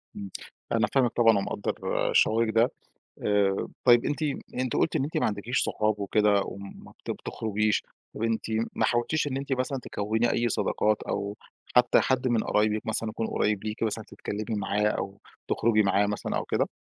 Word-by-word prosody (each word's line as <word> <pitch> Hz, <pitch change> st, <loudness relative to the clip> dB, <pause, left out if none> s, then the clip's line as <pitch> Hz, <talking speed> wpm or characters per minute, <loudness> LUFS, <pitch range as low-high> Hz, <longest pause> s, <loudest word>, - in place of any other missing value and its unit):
امم، 100 Hz, -1 st, -6 dB, 0.4 s
أنا -, -, +2 dB
فاهمِك 130 Hz, -4 st, +3 dB
طبعًا 115 Hz, -3 st, +4 dB
ومقدر 100 Hz, +1 st, -2 dB, 0.4 s
شعورك 115 Hz, +1 st, +3 dB
ده. 115 Hz, +2 st, +4 dB, 0.6 s
آآ، 100 Hz, -2 st, +2 dB, 0.2 s
طيب 120 Hz, -2 st, +6 dB
أنتِ 145 Hz, +1 st, -2 dB, 0.3 s
أنتِ 130 Hz, -1 st, -1 dB
قُلتِ -, -, +1 dB
إن -, -, +1 dB
أنتِ 150 Hz, -, -4 dB
ما -, -, +2 dB
عندكيش 105 Hz, +5 st, -1 dB
صحاب 105 Hz, -1 st, 0 dB
وكده 105 Hz, 0 st, +3 dB
وما 100 Hz, +1 st, -9 dB
بت -, -, -9 dB
بتخرجيش، 110 Hz, -1 st, -1 dB, 0.3 s
طب -, -, -6 dB
أنتِ 115 Hz, -1 st, 0 dB, 0.3 s
ما -, -, +1 dB
حاولتيش 120 Hz, +6 st, +1 dB
إن 135 Hz, -2 st, -2 dB
أنتِ 135 Hz, 0 st, -4 dB
مثلًا 130 Hz, +1 st, -1 dB
تكوّني 110 Hz, +4 st, 0 dB
أي 120 Hz, 0 st, +1 dB
صداقات 105 Hz, -1 st, +1 dB
أو 100 Hz, +1 st, -3 dB, 0.4 s
حتى 125 Hz, 0 st, +6 dB
حد 130 Hz, -1 st, +1 dB
من 115 Hz, -3 st, +1 dB
قرايبك 105 Hz, 0 st, +1 dB
مثلًا 110 Hz, 0 st, 0 dB
يكون 110 Hz, +1 st, -3 dB
قريب 105 Hz, -2 st, 0 dB
ليكِ 110 Hz, +1 st, -4 dB
مثلًا 110 Hz, 0 st, -1 dB
تتكلمي 105 Hz, +1 st, -5 dB
معاه 100 Hz, +1 st, 0 dB
أو 100 Hz, -2 st, -4 dB, 0.3 s
تخرجي 110 Hz, -1 st, +3 dB
معاه 100 Hz, 0 st, +3 dB
مثلًا 105 Hz, 0 st, -3 dB
أو -, -, -1 dB
كده؟ -, -, 0 dB
110 Hz, 175 wpm, -27 LUFS, 105-120 Hz, 0.6 s, طيب